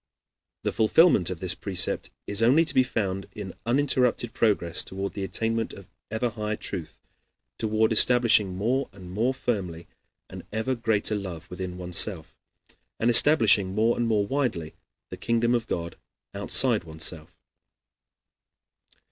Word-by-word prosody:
The - - 0
fulfillment 110 - +4
of 90 -3 -6
this 90 -2 -1
precept 95 -3 -1 0.2
is 105 +2 0
only 135 +9 +4
to - - -3
be 130 - +5
found 95 -6 -2
in 100 -3 -7
uninterrupted 125 -3 +1
progress 90 -6 +1
toward 95 +1 -5
the 100 - -5
attainment 115 +3 -2
of 100 - -11 0.2
ever 110 +3 -1
higher 105 -1 -3
truth, 90 -6 -7 0.6
toward 110 0 +1
establishing 110 -4 +4
more 125 +8 -1
and 90 -2 -11
more 115 +7 0
firmly 95 -10 -4 0.4
an - - -9
ever 110 +5 -1
greater 110 -3 0
love 90 -5 -5
within 90 0 -6
oneself, 90 -1 0 0.6
and 120 +2 +2
establishing 110 -8 +4
more 115 +2 +2
and 120 - -1
more 105 -3 +1
widely 105 - -2 0.4
the - - -6
kingdom 115 +1 0
of 115 -2 -1
God 85 0 -4 0.4
outside - - +3
oneself. 80 +1 -3
105 Hz, 140 wpm, -26 LUFS, 90-120 Hz, 0.6 s, be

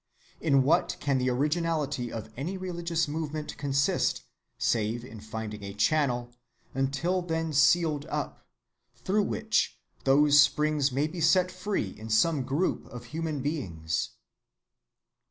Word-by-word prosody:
In 140 -4 +3
what 165 +6 +2
can 140 -2 +1
the 130 0 +1
originality 150 -2 0
of 110 -1 -6
any 165 +9 -3
religious 170 -3 -1
movement 155 0 -4
consist, 140 -1 +1 0.3
save 115 +1 0
in 115 -4 -10
finding 110 -1 -6
a 100 0 -6
channel, 125 -3 +1 0.4
until 140 +8 0
then 165 -2 -2
sealed 150 +1 +3
up, - - -3 0.6
through 185 - 0
which 220 +2 0 0.3
those 145 +2 +6
springs 145 0 +2
may 140 +4 +1
be 170 +2 -5
set 180 +3 +4
free 185 - -2
in 110 +1 -8
some 140 +7 +3
group 140 +8 -1
of 120 -1 -9
human 155 -4 -2
beings? 85 - -2
145 Hz, 130 wpm, -28 LUFS, 125-165 Hz, 0.6 s, those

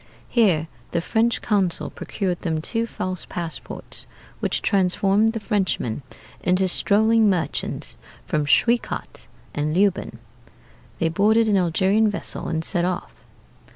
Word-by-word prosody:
Here 185 -10 +3 0.3
the 170 - +2
French 230 +7 0
consul 195 -6 +1
procured 185 -4 -3
them 160 -2 -1
two 225 +8 -1
false 185 -4 -3
passports, 170 -2 -5 0.3
which - - -1
transformed 195 +3 +2
the 225 - -3
Frenchmen 190 - -1 0.4
into 185 +1 +2
strolling 220 +4 +4
merchants 180 -4 -2 0.3
from 150 -1 0
Schwekat 235 +10 +1 0.3
and 150 +1 -1
Leoben. 195 0 +1 0.8
They 165 - +1
boarded 215 +6 +3
an 205 -2 +3
Algerian 190 +5 +3
vessel 205 - -3
and 160 0 -1
set 175 - +1
off. 180 0 -2
190 Hz, 120 wpm, -23 LUFS, 170-215 Hz, 0.8 s, strolling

